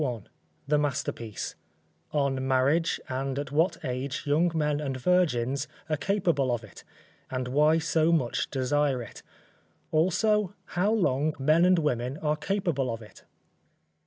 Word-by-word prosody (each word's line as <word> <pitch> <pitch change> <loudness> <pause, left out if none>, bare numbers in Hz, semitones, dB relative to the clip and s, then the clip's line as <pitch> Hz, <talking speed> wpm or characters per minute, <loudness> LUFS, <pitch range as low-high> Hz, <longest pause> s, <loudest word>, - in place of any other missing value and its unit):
BOOK 120 -7 -3
I - - -28 0.4
THE 150 +1 +3
MASTERPIECE 135 -6 -3 0.6
_On 140 -3 0
marriage 135 +5 +2
and 135 +1 -3
at 145 0 -4
what 160 +5 +2
age 130 +1 -3
young 160 +4 +2
men 150 -2 +1
and 135 -3 -3
virgins 140 -4 +1 0.2
are - - +3
capable 165 -7 +1
of 120 -1 -2
it: 110 - -13 0.5
and 130 -1 -3
why 150 +4 +4
so 160 0 +2
much 140 -8 0
desire 135 -1 0
it. 115 - -11 0.7
Also, 190 +5 +2 0.2
how 190 +4 +2
long 155 -8 +1
men 155 +5 +4
and 185 0 +5
women 130 -4 -1
are 150 -1 0
capable 155 - -1
of 115 0 -6
it. 105 - -16
145 Hz, 145 wpm, -28 LUFS, 130-165 Hz, 0.7 s, and